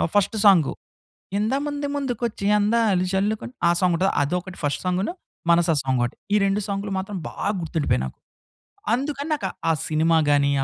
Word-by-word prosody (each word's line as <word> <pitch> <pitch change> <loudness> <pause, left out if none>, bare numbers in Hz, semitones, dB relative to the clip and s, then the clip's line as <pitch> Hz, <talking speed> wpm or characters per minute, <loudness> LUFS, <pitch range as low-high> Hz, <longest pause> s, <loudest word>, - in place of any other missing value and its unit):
First 205 +2 +2
song. 180 -8 +6 0.7
'ఇంత 215 +4 0
మంది 290 0 -3
ముందుకు 265 -5 -2
వచ్చి 205 -3 -7
అందాలు 210 -3 +2
జల్లుకొని' 210 +5 -1 0.2
ఆ - - +5
సాంగ్ 180 -1 +3
ఉంటది, 190 +3 +2
అది 145 +4 -1
ఒకటి 185 0 -10
ఫస్ట్ 145 -1 -1
సాంగును, 180 - 0 0.4
'మనసా' 170 -1 +4
సాంగ్ 130 -1 0
ఒకటి. 120 - -2 0.2
ఈ - - +6
రెండు 195 +1 +1
సాంగ్‌లు 200 0 -3
మాత్రం 195 +1 -5
బాగా - - -3
గుర్తు 165 0 -4
ఉండిపోయాయి 105 - +1
నాకు. 65 - -8 0.8
అందుకని 280 +4 -2
నాకు 290 - -3 0.2
ఆ - - +5 0.2
సినిమా 160 +1 +3
గాని, 140 -1 +3
195 Hz, 175 wpm, -23 LUFS, 165-220 Hz, 0.8 s, సాంగ్